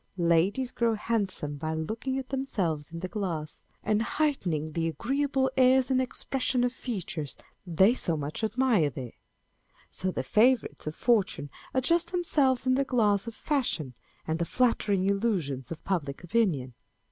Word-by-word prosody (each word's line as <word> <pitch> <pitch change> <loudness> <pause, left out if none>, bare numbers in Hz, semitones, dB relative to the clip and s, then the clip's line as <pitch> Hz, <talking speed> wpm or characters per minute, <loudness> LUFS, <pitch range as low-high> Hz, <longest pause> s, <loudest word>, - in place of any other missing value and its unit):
Ladies 180 +9 +2
grow 230 -1 +1
handsome 200 -10 -2
by 155 +2 -3
looking 220 +11 -3
at 265 -1 -5
themselves 185 - -2
in 165 0 -6
the 185 - -2
glass, 175 -6 -4 0.2
and 215 0 +2
heightening 185 - 0
the 165 +1 -1
agreeable 265 - 0
airs 260 0 +4
and 260 0 +3
expression 255 0 -1
of 245 0 +1
features 180 - -5 0.3
they 190 +6 +5
so 170 -10 -1
much 150 +8 -4
admire 220 - +2
there. 125 -3 -7 0.8
So 185 - -2
the - - -2
favourites 235 -4 +2
of 155 - -3
fortune 195 - +1 0.2
adjust 335 +6 +2
themselves 285 -8 +2
in 255 - +3
the 275 +2 +3
glass 220 -6 +2
of 230 - -6
fashion 235 - -1 0.3
and 160 +1 -1
the 170 - +1
flatter 235 -1 +1
ing 190 -2 +2
illusions 190 - 0
of 165 - -7
public 155 -6 -2
opinion. 175 - +1
210 Hz, 155 wpm, -28 LUFS, 160-255 Hz, 0.8 s, they